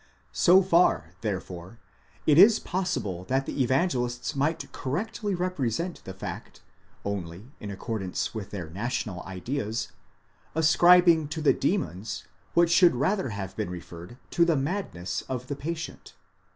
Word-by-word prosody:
So 185 +2 +6
far, 170 - +3
therefore, 95 -1 -5 0.5
it 150 +1 +5
is 215 +3 +8
possible 105 - -2
that 135 +4 0
the - - -2
Evangelists 130 -1 0
might 150 +4 -1
correctly 205 - -3
represent 175 -2 -2
the 95 - -6
fact, - - -7 0.4
only, 100 +3 -5
in 105 - -7
ac 100 - -6
cordance 100 -6 -3
with 110 -4 -5
their 90 -6 -5
national 95 0 -3
ideas, 110 +4 -3 0.7
ascribing 170 0 +6
to 150 +2 -4
the 150 - +5
demons 105 - -2 0.3
what 170 -1 +5
should 175 -4 +6
rather 170 +6 0
have 95 -2 -5
been 105 -3 -3
referred 85 +4 -9
to 170 - +4
the 170 -3 +3
madness 135 - -3
of 125 -1 -3
the 140 - -4
patient. 160 +3 -6
130 Hz, 140 wpm, -27 LUFS, -, 0.7 s, is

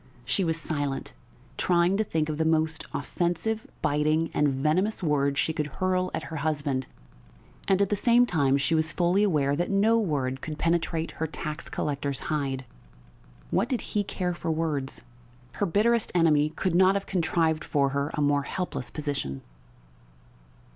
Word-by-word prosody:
She 190 +10 +1
was 165 -1 0
silent, 145 -4 -3 0.5
trying 175 +1 +3
to 220 - +2
think 160 -6 -1
of 155 -1 -3
the - - +3
most 160 0 +1
offensive, 175 +9 -2 0.2
biting, 155 +2 +1
and 150 - +3
venomous 155 +10 0
word 140 -3 +1
she 160 - +1
could 150 -2 -2
hurl 185 +4 0
at - - -4
her - - -3
husband, 145 -3 -1 0.8
and 195 +1 +4
at 195 - -1
the - - +3
same 240 +4 +4
time 140 - +2
she 140 +4 0
was 160 0 +1
fully 175 +5 +2
aware 150 -9 +2
that 175 +4 -1
no 215 +3 +3
word 135 - -1
could 155 -1 -5
penetrate 165 -1 0
her 160 - -3
tax 155 0 -5
collector's 140 -2 -2
hide. 135 -3 -2 0.9
What 205 +7 +1
did 255 -4 -1
he 210 - +2
care 180 -2 -2
for 170 - -4
words? 155 -4 -2 0.5
Her 205 - +1
bitterest 220 +5 +2
enemy 155 -3 +4
could 175 +3 -2
not 190 +2 +5
have 200 - -1
contrived 165 -3 +1
for 140 -2 +1
her 140 +1 -1
a 150 - -1
more 145 0 +3
helpless 160 -3 -4
position. 140 - -4
160 Hz, 165 wpm, -27 LUFS, 145-185 Hz, 0.9 s, not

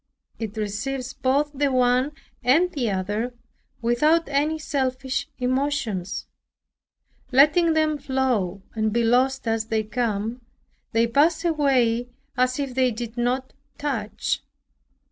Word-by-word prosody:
It 220 -1 -5
receives 250 +5 -3
both 280 +4 +1
the 285 0 +1
one 255 +2 +2 0.3
and 320 +9 +4
the 250 -6 -1
other 205 +6 -2 0.5
without 305 +8 +3
any 295 +3 +1
selfish 270 -2 -2
emotions, 250 -7 -1 1.1
letting 305 +5 +5
them 310 -1 +1
flow 255 -9 -1
and 220 -1 0
be 235 +2 +1
lost 255 +2 +2
as 225 0 0
they 220 -1 0
come. 225 +1 -2 0.5
They 225 +1 +3
pass 310 +8 +2
away 255 -7 +2 0.3
as 255 0 +1
if 275 -3 -3
they 255 0 +3
did 235 0 -5
not 250 +2 -1 0.2
touch. 245 -8 -2
255 Hz, 120 wpm, -24 LUFS, 230-280 Hz, 1.1 s, letting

